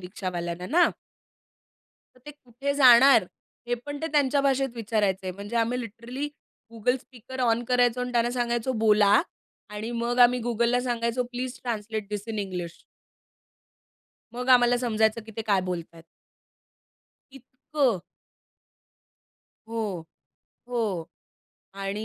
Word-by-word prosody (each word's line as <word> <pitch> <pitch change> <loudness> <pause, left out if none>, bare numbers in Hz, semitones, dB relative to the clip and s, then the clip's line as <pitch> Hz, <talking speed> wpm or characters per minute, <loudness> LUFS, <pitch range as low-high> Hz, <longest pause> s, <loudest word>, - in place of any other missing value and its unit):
रिक्षावाल्यांना, 180 -2 -5
ना. 345 +2 +5 1.2
तर 250 - -23
ते - - -6
कुठे 275 -1 -5
जाणार? 265 0 +7 0.4
हे 245 - +2
पण 290 0 -5
ते 320 - 0
त्यांच्या 285 -1 +3
भाषेत 270 -1 +1
विचारायचंय. 205 -5 -1
म्हणजे 200 +5 -6
आम्ही 230 +2 +1
लिटरली 240 +5 -6 0.4
Google 230 +3 0
स्पीकर 255 +1 -10
ऑन 235 -1 +2
करायचो 245 0 +2
आणि 250 0 -3
त्यांना 235 0 +2
सांगायचो, 240 0 -1
"बोला" 210 -1 +5 0.5
आणि 210 +3 -5
मग 240 +1 -1
आम्ही 245 +1 +6
Googleला 235 +1 +1
सांगायचो, 235 0 -1
please 250 +1 -4
translate 220 -3 -4
this 205 -1 -4
in 220 -1 -3
English. 180 -4 -5 1.5
मग 250 +1 -5
आम्हाला 245 -1 +6
समजायचं 220 -2 +1
की - - -9
ते 225 - -2
काय 200 -3 +3
बोलतायत. 170 -2 -6 1.3
इतकं. 270 - -2 1.7
हो, 215 -6 -3 0.7
हो 210 -9 -2 0.7
आणि 195 +2 -4
235 Hz, 120 wpm, -26 LUFS, 210-250 Hz, 1.7 s, जाणार